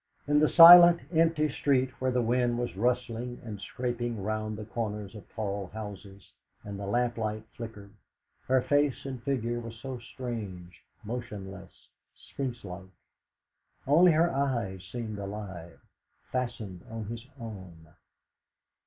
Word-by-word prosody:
In 145 0 +4
the 155 - +4
silent, 175 0 +10
empty 160 -1 +3
street, 130 -2 +1
where 130 - +1
the 125 -1 +1
wind 120 +1 +1
was 120 -4 -3
rustling 120 +2 -1
and 105 -3 -7
scraping 120 -3 -3
round 110 0 -2
the 105 - -7
corners 105 -3 -4
of 105 -3 -12
tall 100 -3 -4
houses, 100 -2 -9 0.3
and 100 -1 -7
the 100 - -5
lamplight 110 -1 -1
flickered, 105 -4 -9 0.5
her 130 -1 +3
face 145 -2 +1
and 130 -3 -5
figure 120 -2 -1
were 115 -1 -7
so 125 +3 -7
strange, 105 -8 -7 0.2
motionless, 100 -5 -8 0.3
Sphinx 125 -3 -6
like. 95 0 -8 1.0
Only 165 +5 +6
her 170 +2 +3
eyes 120 -9 -1
seemed 110 -4 -5
alive, 95 -6 -7 0.5
fastened 120 -8 -4
on 115 -1 -5
his 115 +3 -7
own. 95 -8 -10
115 Hz, 130 wpm, -29 LUFS, 100-125 Hz, 1.0 s, silent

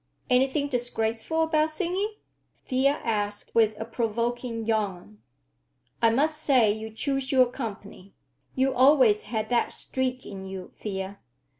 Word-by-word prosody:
"Anything 265 +3 +2
disgraceful 245 +3 0
about 315 -1 +2
singing?" 375 +6 -2 0.5
Thea 265 +2 +2
asked 205 -2 -2
with 220 -2 +3
a 225 - -3
provoking 230 0 -2
yawn. 195 - -2 0.8
"I 230 - +5
must 305 +6 +1
say 250 -8 +4
you 220 +1 -5
choose 270 +4 -2
your 260 -2 +6
company! 205 -6 -8 0.4
You 265 +1 +2
always 255 -5 +5
had 220 -2 -2
that 240 -1 +1
streak 260 -1 0
in 195 -1 -8
you, 190 -1 -8
Thea. 195 -1 -5
235 Hz, 130 wpm, -26 LUFS, 215-270 Hz, 0.8 s, your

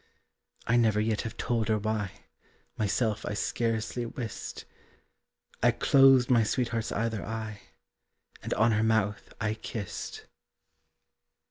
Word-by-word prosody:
I 120 - +3
never 110 -3 +3
yet 110 0 0
have 115 - -6
told 115 -3 0
her 110 -1 +2
why, 105 -2 -3 0.5
Myself 110 +1 0
I 105 - -3
scarcely 115 +2 -1
wist. 115 -1 -6 1.0
I - - +5
closed 135 -2 +5
my 120 -2 +5
sweetheart's 115 0 -1
either 115 -1 -1
eye, 110 -1 -5 0.8
And - - -6
on 110 +2 +4
her 110 0 +2
mouth 110 -2 0
I 110 -1 0
kissed. 110 -3 -6
110 Hz, 120 wpm, -29 LUFS, 105-115 Hz, 1.0 s, I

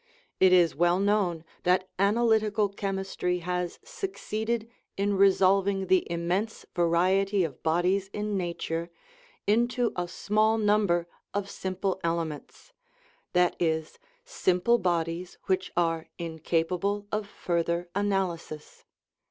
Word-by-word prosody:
It 190 -1 +6
is 175 -3 +5
well 175 +3 +3
known 195 -5 +1 0.2
that 185 +1 +2
an 200 +2 +3
alytical 215 -3 +2
chemistry 190 -2 -2
has 180 -1 -2
succeeded 235 - -3 0.3
in 200 +1 +1
resolving 195 0 +3
the 185 0 +4
im 170 0 -3
mense 200 +6 -1
variety 185 +3 +2
of 150 -6 -5
bodies 180 +4 +1
in 210 0 -2
nature 170 -2 -3 0.6
into 240 +3 +2
a 180 -1 -2
small 215 +4 +1
number 205 -5 +2 0.3
of 200 -1 -2
simple 190 0 -2
elements 165 - -4 0.6
that 180 -1 +3
is, 160 - -1 0.3
simple 235 - +2
bodies 175 -1 -1
which 185 -1 -1
are 165 -2 0
incapable 170 +4 -1
of 210 -1 -2
further 170 -2 -1
analysis. 190 -6 -2
185 Hz, 115 wpm, -28 LUFS, 170-205 Hz, 0.6 s, It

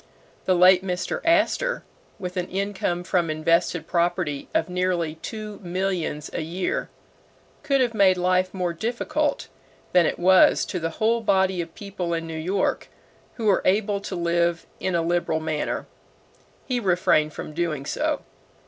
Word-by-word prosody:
The 185 - +3
late 180 +1 +6
Mr. 180 -1 -2
Astor, 335 +10 +2 0.3
with 180 -3 -6
an 180 -1 -2
income 190 -2 -2
from 175 -2 0
invested 160 +1 +1
property 170 -4 -1
of 160 - +1
nearly 180 -3 -1
two 215 -2 -6
millions 180 -5 -2
a - - -2
year, 175 +4 -2 0.7
could 275 -1 +2
have 240 -2 +1
made 195 -3 +4
life 185 +1 +2
more 180 -3 -2
difficult 230 +8 -1 0.5
than 180 -2 +5
it - - -2
was 185 +1 +5
to 185 - -3
the 165 0 -2
whole 230 +2 +2
body 190 -4 +2
of 165 -1 -9
people 185 -4 -4
in 165 0 -3
New 165 - -6
York 185 +5 -1 0.5
who 225 -3 -2
are 200 - +4
able 200 +1 +1
to 195 - -5
live 170 0 0
in 185 -2 -1
a 170 - +1
liberal 170 -1 0
manner. 155 -1 -2 0.8
He 250 -3 -1
refrained 175 -6 +2
from 150 - -7
doing 155 -4 -2
so. - - -1
180 Hz, 155 wpm, -24 LUFS, 170-195 Hz, 0.8 s, late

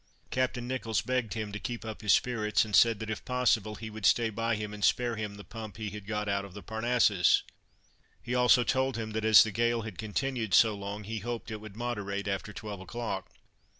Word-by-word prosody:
Captain 125 -1 -1
Nicholls 125 -4 -1
begged 125 -5 -1
him 110 -2 -3
to 105 - -5
keep 115 +1 -5
up 110 0 -6
his 105 -2 +2
spirits, 110 -4 +2
and 105 -2 -1
said, 115 -2 +6
that, 110 +1 -6
if 110 - -5
possible, 115 -4 +1
he 110 +1 -7
would 110 0 -9
stay 115 -2 +3
by 115 +2 0
him 105 0 -5
and 105 0 -7
spare 120 -1 +2
him 105 -2 -4
the 100 - -10
pump 110 -2 -8
he 110 -3 -4
had 105 -1 -9
got 105 -1 -2
out 100 0 0
of 100 -1 -11
the 105 - -8
Parnassus; 110 -3 +3 0.8
he 120 - -5
also 125 0 +5
told 130 -1 0
him 110 -1 -4
that, 110 0 -2
as 110 -1 +8
the 110 - -3
gale 120 +2 +1
had 110 -5 -8
continued 110 0 -1
so 110 -2 +6
long, 100 +1 -6
he 110 +2 -4
hoped 120 +2 -5
that - - -5
it 105 - -6
would 110 -2 -10
moderate 105 -4 -3
after 100 +2 -3
twelve 105 -1 -7
o'clock. 100 -1 -5
110 Hz, 225 wpm, -30 LUFS, 105-120 Hz, 0.8 s, as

